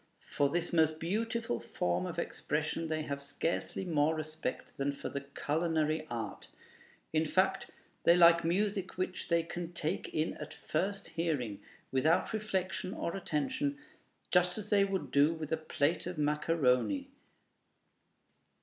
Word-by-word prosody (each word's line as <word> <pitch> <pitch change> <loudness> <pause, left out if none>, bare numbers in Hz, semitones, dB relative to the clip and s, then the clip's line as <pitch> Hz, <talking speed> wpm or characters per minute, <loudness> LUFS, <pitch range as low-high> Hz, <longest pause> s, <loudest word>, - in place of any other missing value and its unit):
For 140 -1 +3
this 175 +3 -1
most 160 -1 +3
beautiful 220 - -1
form 90 +1 -1
of - - -5
expression 155 +2 -2
they 155 0 -1
have 140 -2 -4
scarcely 165 +6 -2
more 160 -2 +2
respect 155 0 -4
than 140 +1 0
for - - -5
the 140 - -3
culinary 155 +2 0
art. 115 -3 -5 0.7
In 160 0 +2
fact, 190 +3 +2 0.4
they 170 - +7
like 170 -1 +7
music 195 +2 0
which 185 0 -2
they 170 -1 +3
can 175 +1 -5
take 165 +2 -2
in 155 +1 0
at - - -7
first 195 +5 -2
hearing, 145 -11 -1 0.3
without 160 - +2
reflection 190 -2 -2
or 170 - -2
attention, 260 - -1 0.5
just 180 0 +3
as 215 - -6
they 200 -1 +6
would 190 -9 -2
do 145 +4 +4
with 155 -2 -6
a 160 - +2
plate 155 +1 0
of 180 -2 -4
macaroni. 150 - +2
165 Hz, 140 wpm, -33 LUFS, 150-185 Hz, 0.7 s, they